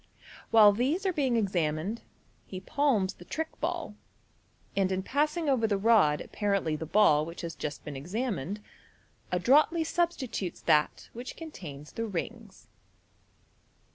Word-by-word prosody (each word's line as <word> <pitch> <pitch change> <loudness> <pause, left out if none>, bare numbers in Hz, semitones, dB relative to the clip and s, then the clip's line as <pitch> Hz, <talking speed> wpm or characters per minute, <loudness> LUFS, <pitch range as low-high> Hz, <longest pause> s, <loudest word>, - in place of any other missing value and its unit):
While 215 -2 +7
these 280 - 0
are 375 - +1
being 270 -6 +1
examined, 185 0 -1 0.5
he 185 - -6
palms 225 -5 +1
the - - -14
trick 320 - -3
ball, 330 -7 -2 0.8
and 190 -1 +1
in 190 0 -1
passing 300 - 0
over 250 -5 +2
the 205 -2 +1
rod 195 -8 +4
appa 210 - -7
rently 195 -6 +1
the 160 - -5
ball 165 -5 +4
which 165 +2 -7
has 170 -1 -5
just 150 -1 -6
been 150 - -6
examined, 200 - -3 0.7
adroitly 290 - +4
substitutes 320 - -2
that 150 0 +1
which 245 +2 -7
contains 155 - -9
the 230 0 -3
rings. 215 +2 -6
210 Hz, 140 wpm, -29 LUFS, 175-270 Hz, 0.8 s, While